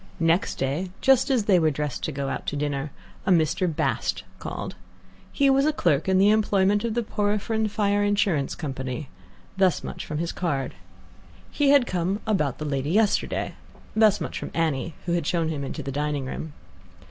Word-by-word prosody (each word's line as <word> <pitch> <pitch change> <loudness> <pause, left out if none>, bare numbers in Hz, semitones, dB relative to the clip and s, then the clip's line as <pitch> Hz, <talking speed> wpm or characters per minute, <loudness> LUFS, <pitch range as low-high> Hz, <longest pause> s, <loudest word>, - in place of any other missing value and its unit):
Next 165 +3 +2
day, 145 +8 -2
just 270 +1 +4
as 255 -5 +2
they 190 -4 +5
were 160 -1 +3
dressed 150 -2 -3
to - - -2
go 140 -1 -3
out - - -4
to - - -1
dinner, 145 0 -2 0.4
a - - +3
Mr. 175 +1 +3
Bast 155 - -1 0.2
called. - - -5 0.6
He 280 - +2
was 270 0 +4
a - - +4
clerk 170 - +1
in 190 - +4
the 200 +2 +6
employment 205 -1 +2
of 230 -1 -1
the 240 - +1
Porphyrion 215 +1 0
Fire 205 -1 +1
Insurance 200 -9 +1
Company. 135 -2 -5 0.5
Thus 185 -5 +3
much - - -6
from 150 - -4
his 170 +2 -2
card. 140 -7 -2 0.8
He 290 -2 +2
had 280 -3 +6
come 185 0 -1
"about 155 - 0
the 155 - -5
lady 140 -1 -1
yesterday." 210 +3 +1 0.4
Thus 215 -2 +5
much - - -4
from - - -5
Annie, 160 -1 -1
who 175 - -1
had 170 -3 0
shown 165 -3 +1
him 150 -3 -3
into 135 - -5
the 135 - -4
dining 145 -1 -1
room. 150 +3 -6
175 Hz, 185 wpm, -25 LUFS, 150-210 Hz, 0.8 s, the